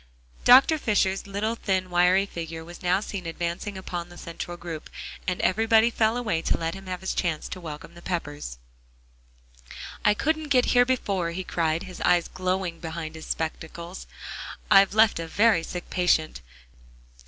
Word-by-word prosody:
Dr. 270 +5 +7
Fisher's 200 -5 +1
little 205 +3 -1
thin, 190 -5 -1
wiry 180 +2 +4
figure 165 -3 -6
was 175 +1 -11
now 180 +2 +2
seen 195 -5 -5
advancing 170 +4 -3
upon 175 -2 -5
the 175 - -13
central 175 +1 -6
group, 165 -3 -7 0.4
and 180 -1 -1
everybody 225 +3 +4
fell 225 +1 +2
away 215 -10 -1
to - - +1
let 165 0 -2
him 195 0 -10
have 180 0 -4
his 190 - -2
chance 165 -4 -1
to 185 - -6
welcome 150 -3 -8
the 170 - -13
Peppers. 145 - -4 1.5
"I 210 - +4
couldn't 315 +5 0
get 255 -3 +4
here 245 0 +6
before," 200 -9 0
he 180 +3 -4
cried, 165 -2 0
his 185 -1 -9
eyes 175 -1 +3
glowing 185 -2 -2
behind 160 -1 -5
his 160 0 -9
spectacles. 170 +2 -5 0.6
"I've 195 +1 +6
left 220 -4 +5
a 165 - -4
very 205 +1 +4
sick 175 +1 -6
patient. 170 - +1
180 Hz, 165 wpm, -26 LUFS, 170-205 Hz, 1.5 s, Dr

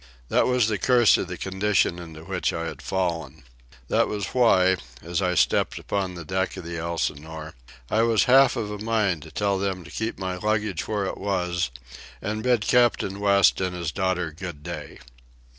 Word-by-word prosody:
That - - +3
was 125 -3 +3
the 105 -3 -1
curse 120 +1 +5
of - - -3
the - - -6
condition 95 -2 +1
into 80 -2 -10
which - - -1
I 85 - -3
had 80 - -6
fallen. 85 -6 -2 0.4
That - - +2
was 100 -2 -3
why, 95 -7 +4 0.3
as 85 +3 -2
I 90 -1 +1
stepped - - +2
upon 95 -2 -2
the 85 -2 -8
deck 95 +4 -1
of - - -6
the 85 0 -5
Elsinore, 80 -1 -4 0.3
I 110 - +2
was 115 -1 +3
half 135 +1 +6
of 105 -3 -3
a 105 - -5
mind 105 -6 0
to 80 - -11
tell 100 -2 0
them 95 -2 -2
to 85 - -13
keep 110 +1 -3
my 95 -1 -3
luggage 105 -3 -1
where 105 -2 -1
it - - -4
was 90 -5 -1 0.5
and 105 +2 -3
bid 125 -1 +2
Captain 115 -5 +2
West 100 -2 +4
and 90 -1 -1
his 85 -3 -3
daughter 90 -3 -1
good 80 -2 -8
day. 75 -3 -7
95 Hz, 190 wpm, -25 LUFS, 85-105 Hz, 0.5 s, half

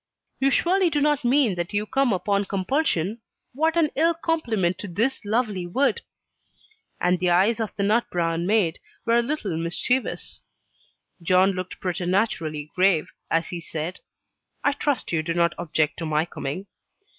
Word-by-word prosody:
"You 270 - +3
surely 360 +6 +3
do 295 -2 0
not 295 -1 +2
mean 245 -3 +3
that 175 +2 -4
you 205 +1 0
come 270 +2 +1
upon 200 +1 +1
compulsion? 200 - 0 0.3
What 320 +5 +1
an 315 -3 +3
ill 330 +3 +3
compliment 230 - 0
to 205 - -5
this 225 +10 0
lovely 210 -4 -1
wood." 275 - +1 1.0
And 180 0 +2
the 180 0 +1
eyes 195 +7 +3
of 220 -2 -3
the 200 - -1
"nut 220 +4 +2
browne 170 0 -1
mayde" 200 -6 +2 0.3
were 230 0 +3
a - - +5
little 235 - -2
mischievous. 175 +10 -1 0.8
John 185 +3 +4
looked 185 -1 -6
preternaturally 175 -4 -1
grave, 185 -4 +3 0.2
as 165 0 +1
he 175 - -4
said, 165 +1 -5 0.6
"I - - +4
trust 285 -2 -1
you 165 -2 +1
do 165 +2 -3
not 170 -1 +3
object 155 -3 0
to 165 - -4
my 155 +1 +1
coming?" 170 +2 -5
195 Hz, 160 wpm, -24 LUFS, 175-255 Hz, 1.0 s, a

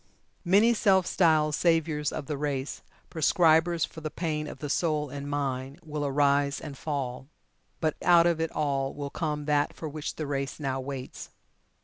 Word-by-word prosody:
Many 205 +6 +5
self 195 -4 +3
styled 155 -5 +3
saviours 160 -2 +1
of 155 - -5
the 150 - -3
race 140 -1 -3 0.3
prescribers 165 0 +3
for 160 - -11
the 155 - -3
pain 155 -2 -3
of - - -8
the 150 - -5
soul 150 -1 0
and 140 0 -6
mind 135 0 -3
will 150 -1 -3
arise 140 0 +2
and 145 -3 -8
fall. 135 -3 -4 0.5
But 155 -1 0
out 170 -1 +6
of 170 -2 +2
it 165 - 0
all 140 -3 -1
will 145 -1 -5
come 150 -3 -3
that 145 0 +1
for 160 - -6
which 150 0 -5
the 155 - -4
race 140 0 -3
now 135 -3 -2
waits. 130 -1 -7
150 Hz, 170 wpm, -28 LUFS, 140-160 Hz, 0.5 s, out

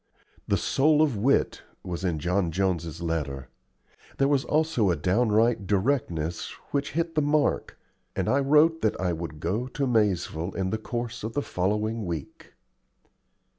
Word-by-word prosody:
"The - - +2
soul 150 +2 +3
of 145 -6 +1
wit" 125 +7 +1 0.2
was 90 0 -5
in 85 -4 0
John 85 +3 0
Jones's 85 -2 -1
letter. 70 -6 -3 0.7
There 135 - +3
was 140 -2 +2
also 155 -9 +1
a 85 - +2
downright 110 +2 +2
directness 95 - 0 0.2
which 140 0 -1
hit 165 +1 -1
the 155 - +2
mark, 145 0 +1 0.4
and - - -1
I 135 - +3
wrote 150 +4 +4
that 110 - 0
I 90 -1 0
would 80 -2 -6
go 105 +11 -1
to 140 +2 -2
Maizeville 100 -7 0
in 95 -1 -1
the 110 - -1
course 120 0 -4
of 110 +1 -4
the 145 - -1
following 105 +3 -1
week. 80 -5 -7
105 Hz, 155 wpm, -26 LUFS, 85-140 Hz, 0.7 s, wrote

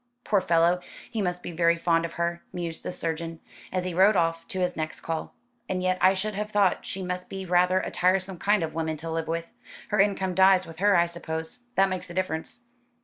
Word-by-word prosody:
"Poor 205 -3 +2
fellow, 170 0 +3 0.3
he 225 -3 -1
must 180 -2 -2
be - - -5
very 170 0 +3
fond 165 0 +2
of 165 - -6
her," 170 0 -2
mused 170 -2 -4
the - - -4
surgeon, 165 -1 -3 0.3
as 185 -1 -1
he 180 - -2
rode 195 +4 +5
off 165 -1 +1
to 190 - -4
his 180 -1 0
next 155 -1 -4
call. 165 -1 -4 0.3
"And 185 -1 -1
yet 185 0 +1
I 190 +1 +6
should 210 +3 -2
have 210 +1 -3
thought 205 -3 +2
she 190 - -4
must 180 0 -4
be 190 -1 -5
rather 180 +1 +3
a - - -4
tiresome 185 0 +1
kind 205 -3 +2
of 160 - -3
woman 160 -1 -2
to 165 +2 -6
live 165 0 -2
with. 165 0 -3 0.4
Her 210 - +1
income 195 -2 +2
dies 190 0 +5
with 165 0 -11
her 205 +1 +4
I 170 - +5
suppose. 160 +3 -5 0.2
That 195 0 +5
makes 185 -1 -4
a 175 - -8
difference." 185 +5 -3
180 Hz, 225 wpm, -27 LUFS, 165-190 Hz, 0.4 s, I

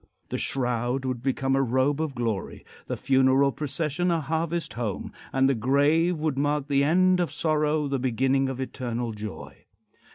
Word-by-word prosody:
The - - -2
shroud 125 0 -1
would 130 -2 -2
become 135 0 0
a 135 - +3
robe 135 +4 +1
of 155 -4 -3
glory, 115 -5 -3 0.2
the - - -3
funeral 135 +1 +3
procession 155 +4 -2
a 170 -1 +2
harvest 165 +2 -2
home, 115 -5 -4 0.2
and 135 0 +3
the 135 - +3
grave 145 +8 +2
would 150 -3 -1
mark 145 0 0
the 140 -1 +3
end 185 +4 +4
of 175 - 0
sorrow, 155 -2 +1
the 135 -1 -1
beginning 130 +2 +1
of 130 -1 -5
eternal 120 -3 -3
joy. 105 -1 -8
135 Hz, 165 wpm, -26 LUFS, 130-155 Hz, 0.2 s, end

